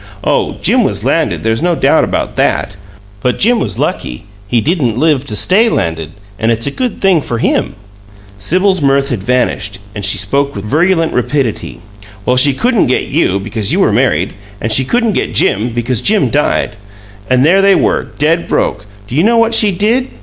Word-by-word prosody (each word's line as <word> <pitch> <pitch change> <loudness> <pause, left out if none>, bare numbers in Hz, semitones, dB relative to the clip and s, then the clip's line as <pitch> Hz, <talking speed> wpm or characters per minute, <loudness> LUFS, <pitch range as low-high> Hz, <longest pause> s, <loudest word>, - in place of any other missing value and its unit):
Oh, - - 0
Jim - - +3
was - - -2
landed - - 0
there's 115 +2 0
no 175 0 +1
doubt - - +2
about - - -2
THAT! - - 0 0.5
But 125 +2 0
Jim 235 +2 +2
was 105 -6 -3
lucky; 60 - -3 0.2
he 120 +3 +1
didn't 130 - 0
live 145 -2 +1
to 105 - -2
STAY 215 - +3
landed, 80 - -2 0.3
and 115 +1 +1
it's 115 0 -1
a 140 - -1
good 250 - -3
thing 190 -5 +3
for 120 - -4
him!" - - -1 0.6
Sibyl's 185 - +1
mirth 140 0 +1
had 115 -6 -3
vanished, 105 -3 -1 0.2
and 105 - -6
she 100 - +1
spoke 140 +9 -1
with 100 0 -6
virulent 165 - +1
rapidity. 125 -2 -2 0.4
"Well, 125 - +2
she 140 +3 +4
couldn't 240 - +1
get 130 - -1
you, 115 - +1
because 105 0 -3
you - - +1
were - - +2
married, 85 +6 +1 0.3
and 110 - -3
she 130 +4 +3
couldn't 230 - 0
get - - -2
Jim, 110 +5 +1
because 120 0 -2
Jim 200 - +1
died. 145 -7 0 0.5
And 130 +1 +3
there 190 +5 +4
they 195 0 +4
were, - - +1
dead 165 +3 +1
broke! 105 0 -1 0.2
Do 110 - -10
you 155 - +3
know 230 +5 +3
what 230 0 +2
she 215 -2 +4
did? 225 +8 0
135 Hz, 195 wpm, -13 LUFS, 110-185 Hz, 0.6 s, she